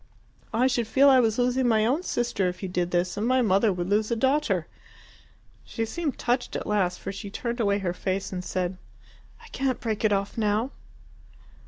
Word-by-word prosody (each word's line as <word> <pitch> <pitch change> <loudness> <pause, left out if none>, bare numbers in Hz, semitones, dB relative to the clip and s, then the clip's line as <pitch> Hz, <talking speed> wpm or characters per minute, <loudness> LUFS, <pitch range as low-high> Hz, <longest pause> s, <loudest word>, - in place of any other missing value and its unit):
I 230 +3 +2
should 240 -3 +1
feel 275 +5 +5
I 260 - +6
was 225 -3 +2
losing 250 +1 +2
my 220 -2 +3
own 270 +9 +1
sister 240 - -1
if 180 +2 -8
you 190 - -3
did 180 -1 -1
this, 175 0 0
and 215 +3 0
my 255 0 +3
mother 200 +1 +3
would 175 -1 -3
lose 210 +2 +1
a 235 - +1
daughter." 245 - +1 1.0
She 225 - -3
seemed 300 +4 -3
touched 245 +1 -1
at - - -3
last, 185 -4 0
for - - -5
she 200 +1 -7
turned 235 +4 -4
away 200 -3 +2
her 185 -3 -2
face 190 +1 -3
and 180 -1 -4
said, 180 0 -2 0.7
"I - - -13
can't 265 -1 -1
break 220 -2 -3
it 215 - +3
off 200 +2 -1
now!" 215 +4 +1
215 Hz, 200 wpm, -26 LUFS, 190-245 Hz, 1.0 s, I